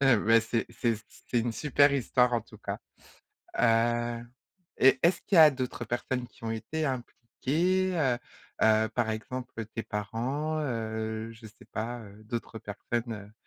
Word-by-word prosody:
et 135 -3 +6
ben 115 +2 +5
c'est 115 +1 -1
c'est 115 -1 0 0.3
c'est 120 - +2
une 115 0 -1
super 140 +4 +4
histoire 125 -2 +3
en 120 - +2
tout 115 - -15
cas. - - -4 0.8
Heu 120 0 +2 0.5
et 135 0 +6
est-ce 170 +3 +4
qu'il 195 - 0
y - - +10
a 155 -1 +10
d'autres 130 -2 -4
personnes 120 +2 -2
qui - - -20
ont 110 - -1
été 155 +8 -2
impliquées, 155 +9 0
heu 130 -6 +2 0.4
heu, 110 0 +5
par 115 0 0
exemple 115 +1 -4
tes 115 - -2
parents, 125 +9 -2
heu, 110 -4 -3
je 115 0 -14
sais 110 - -17
pas, 120 +2 -4
heu, 105 0 -13
d'autres 115 +1 -5
personnes, 110 0 -4
120 Hz, 160 wpm, -29 LUFS, 110-130 Hz, 0.8 s, y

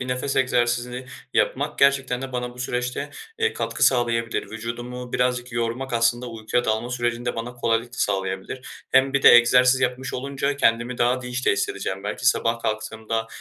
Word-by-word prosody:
bir 125 - -4
nefes 125 +2 -2
egzersizini 125 -1 0 0.3
yapmak 145 +3 0
gerçekten 135 -2 +3
de 135 -1 -6
bana 125 -1 -3
bu - - -16
süreçte, 125 0 -3 0.3
eee, 455 0 +1
katkı - - -4
sağlayabilir. 115 -2 0
Vücudumu 120 +2 -6
birazcık 125 0 0
yormak, 120 +3 -2
aslında 120 +1 +1
uykuya 115 +1 -2
dalma 110 +2 -1
sürecinde 120 0 -2
bana 120 +2 -5
kolaylık 115 -1 0
da - - -10
sağlayabilir. 95 +5 -2 0.3
Hem 135 +1 +4
bir 140 - +1
de - - +10
egzersiz 125 +2 +6
yapmış 130 0 -1
olunca 140 +2 -2
kendimi 120 -1 +1
daha 125 +1 +2
dinç 125 +1 -4
de - - +5
hissedeceğim 100 0 -3
belki. 105 - -3
Sabah 115 -1 +2
kalktığımda 110 0 -3
125 Hz, 165 wpm, -23 LUFS, 115-125 Hz, 0.3 s, de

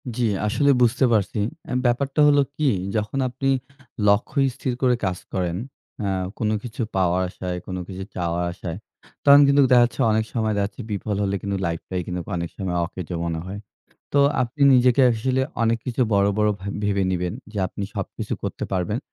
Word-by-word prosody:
জি, 125 0 +1 0.2
আসলে 140 +6 +3
বুঝতে 125 +3 +4
পারছি। 105 0 +1 0.3
অ্যা - - -4
ব্যাপারটা 135 +4 +1
হলো 145 -1 +5 0.2
কি, 150 -2 +2 0.3
যখন 110 +5 -1
আপনি 135 +2 -2 0.6
লক্ষ্য 100 +8 +2 0.2
স্থির 130 - -2
করে 125 -1 +4
কাজ 90 -1 -1 0.2
করেন 90 -2 -1 0.5
অ্যা 100 -2 0 0.3
কোনো 110 -1 +1
কিছু 120 -1 -6
পাওয়ার 90 -1 +2
আশায়, 90 -1 -5
কোনো 95 -1 -4
কিছু 95 0 -6
চাওয়ার 85 -1 -1
আশায়, 85 0 -6 0.5
তখন 140 0 +9
কিন্তু 140 0 +5
দেখাচ্ছে 120 -1 +4
অনেক 110 0 +1
সময় 110 -2 0
দেখাচ্ছে 100 +4 -2
বিফল 105 +1 -2
হলে 100 0 0
কিন্তু 100 -1 -2
লাইফটাই 85 +2 -3
কিন্তু 90 -1 -3
অনেক 85 -1 -3
সময় 90 -3 -2
অকেজো 90 -1 -6
মনে 80 -1 -2
হয়। 100 +2 -6 0.5
তো 140 - +4 0.2
আপনি 130 +4 -4
নিজেকে 125 +1 +4
আসলে 130 +4 0 0.2
অনেক 115 0 +2
কিছু 125 0 -1
বড়, 100 0 +4
বড় 105 0 +3
ভাব 100 +1 -5
ভেবে 100 -1 +1
নিবেন, 90 -1 -1 0.2
যে 105 - -7
আপনি 100 - -6
সবকিছু - - -4
করতে - - -4
পারবেন। 95 +5 -1
105 Hz, 175 wpm, -23 LUFS, 95-125 Hz, 0.6 s, তখন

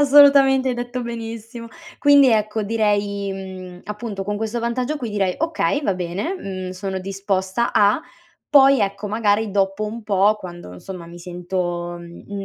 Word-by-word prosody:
assolutamente, 275 -2 +6
hai - - -1
detto 245 +1 -4
benissimo! 230 0 -7 0.3
Quindi, 285 -2 +6
ecco, 215 0 +1
direi, 205 -2 0
mhmm, 185 -2 -8
appunto 210 -1 -5
con 205 +1 -2
questo 220 +2 -2
vantaggio 245 +5 -1
qui 245 -6 -5
direi: 195 -3 0
"Okay! 310 -2 0
Va 200 - +1
bene, 180 - -3
mhmm, 185 - -5
sono 190 +1 -4
disposta 195 +3 -1
a". 205 +6 +4 0.5
Poi, 275 -2 +6
ecco, 200 +1 -2
magari 215 0 +1
dopo 195 +1 0
un 225 +2 -5
po', 205 0 +3
quando 175 - -9
insomma 170 - -9
mi 170 +1 -11
sento, 175 0 -3
mhmm, 185 +4 -8
205 Hz, 155 wpm, -21 LUFS, 190-235 Hz, 0.5 s, assolutamente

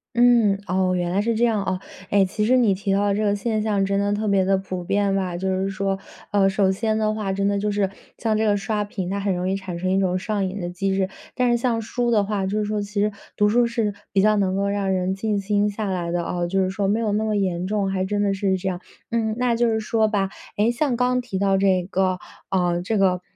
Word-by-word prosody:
嗯， 235 -5 +4
哦， 185 0 +1
原 175 -1 -1
来 200 +2 +1
是 230 +1 0
这 230 - +1
样 220 -3 +1
啊。 185 -1 -2 0.3
诶 200 -1 +4
其 210 +3 -2
实 255 +3 +4
你 220 -6 +4
提 195 +1 -2
到 200 0 +2
这 215 +2 0
个 205 -1 +2
现 215 +1 -1
象 205 -2 +1
真 195 0 0
的 205 0 +1
特 215 +1 -1
别 195 -2 +3
地 195 0 +3
普 185 -2 -5
遍 200 +1 +1
吧。 180 -3 -1
就 190 - -3
是 195 - -1
说 195 -1 -2 0.3
呃， 195 -1 +4
首 195 0 +2
先 220 +2 0
的 215 -1 +1
话， 210 -3 -2
真 200 +1 0
的 200 0 +1
就 210 0 0
是 200 -2 +1 0.3
像 220 -2 0
这 220 - +1
个 205 -1 +3
刷 210 +1 -1
屏 190 -3 -5
它 200 - -2
很 195 -2 0
容 180 +1 -1
易 195 - 0
产 190 -3 -5
生 185 +1 -1
一 190 - +2
种 185 -1 +1
上 200 0 -1
瘾 200 +2 -6
的 175 - -3
机 190 +2 -1
制。 190 -1 0 0.3
但 250 -1 +2
是 240 - +3
像 235 -2 0
书 240 +2 -1
的 215 -3 +3
话 200 -1 -1
就 205 +2 -1
是 210 - 0
说 210 0 -1
其 205 - -6
实 210 0 +2 0.2
读 210 - +3
书 240 +2 +3
是 225 -4 -1 0.2
比 195 - +3
较 215 +1 +4
能 190 -1 +1
够 200 0 0
让 200 -1 0
人 185 0 0
静 205 +1 -1
心 205 +1 +1
下 210 +1 -4
来 175 -2 -2
的， 175 -1 -1
哦 175 0 -2
就 190 +2 +1
是 185 - 0
说 195 0 -1
没 215 +3 +1
有 215 -2 0
那 215 +1 0
么 215 -1 0
严 185 -3 -1
重， 200 -2 0
还 190 -1 -1
真 205 +1 -1
的 200 -1 +1
是 190 -1 0
这 190 +1 -2
样。 180 -1 -4 0.3
嗯， 220 -2 0
那 245 -2 +1
就 240 0 +2
是 220 -1 +1
说 220 0 +1
吧 195 -3 0 0.3
诶， 220 +3 +3
像 250 0 0
刚 250 +1 +1
提 235 -6 -5
到 195 0 +2
这 190 -2 +2
个 185 0 0 0.3
啊 175 -2 +1
这 215 +4 -1
个 185 -2 +2
200 Hz, 290 characters per minute, -23 LUFS, 190-215 Hz, 0.3 s, 嗯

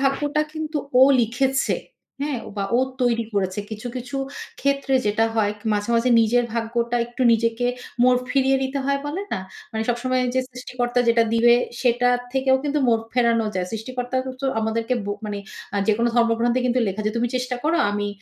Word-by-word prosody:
ভাগ্যটা 290 +2 +1
কিন্তু 310 -1 -3 0.2
ও - - +9 0.2
লিখেছে, 260 +4 +1 0.5
হ্যাঁ? 285 -3 -1
ও - - -7
বা 200 - -1
ও - - +3 0.2
তৈরি 235 -2 +2
করেছে। 190 0 0
কিছু, 215 +2 -6
কিছু 250 +2 -5 0.4
ক্ষেত্রে 275 -1 +1
যেটা 210 +2 +2
হয় 210 -2 +2 0.2
মাঝে, 205 +1 -1
মাঝে 240 +2 +2
নিজের 235 +2 +3
ভাগ্যটা 235 +1 -1
একটু 240 +2 -4
নিজেকে 230 +1 +1 0.4
মোড় 250 0 +5
ফিরিয়ে 270 0 +3
দিতে 265 +1 -2
হয় 280 +1 +1
বলে 320 +7 -3
না? - - -1 0.3
মানে 220 0 -1
সবসময় 255 +2 0
যে 260 - +3
সৃষ্টিকর্তা 250 0 -2 0.3
দিবে 235 +1 +6 0.3
সেটা 245 0 +2 0.2
থেকেও 265 0 +3
কিন্তু 295 +1 0
মোড় 225 -1 +3
ফেরানো 235 -2 +2
যায়। 185 -1 -1
সৃষ্টিকর্তাকে 255 +3 -3
তো - - +1
আমাদেরকে 225 +2 -1
ব - - -8 0.2
মানে 205 -1 -3 0.4
আ - - 0
যেকোনো 230 +2 +3
ধর্মগ্রন্থে 235 +1 +2
কিন্তু 250 0 +1
লেখা 195 +2 -3
যে - - +2
"তুমি 240 +1 +1
চেষ্টা 250 0 -2
করো। 325 +2 +2
আমি 205 0 -2
245 Hz, 175 wpm, -23 LUFS, 225-260 Hz, 0.5 s, ও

